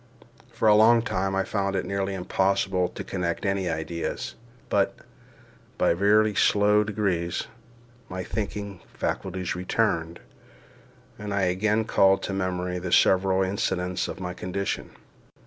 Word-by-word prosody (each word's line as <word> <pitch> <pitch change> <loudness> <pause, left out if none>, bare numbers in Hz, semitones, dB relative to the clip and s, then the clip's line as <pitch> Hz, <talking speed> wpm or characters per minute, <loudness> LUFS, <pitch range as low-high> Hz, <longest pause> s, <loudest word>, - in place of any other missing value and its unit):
For 110 - 0
a 105 - +7
long 115 +2 +6
time 95 -5 -1
I 95 - +1
found 100 -1 -1
it 95 - -1
nearly 100 0 -2
impossible 95 0 +1
to - - -7
connect 90 0 -3
any 95 -2 0
ideas; 80 +1 -3 0.3
but, - - +1 0.8
by - - +3
very 105 +4 +3
slow 105 +1 +4
degrees, 100 -5 -1 0.6
my 90 0 -4
thinking 100 -2 -4 0.2
faculties 95 -2 -3
returned, 90 -3 -1 1.0
and 105 0 -5
I 100 0 0
again 105 +4 +1
called 95 -2 +3
to 100 - -3
memory 90 -1 -2
the 90 -1 -5
several 95 +1 +4
incidents 95 -2 -1
of - - -6
my 90 -1 -4
condition. 95 +2 -3
95 Hz, 130 wpm, -26 LUFS, 90-100 Hz, 1.0 s, a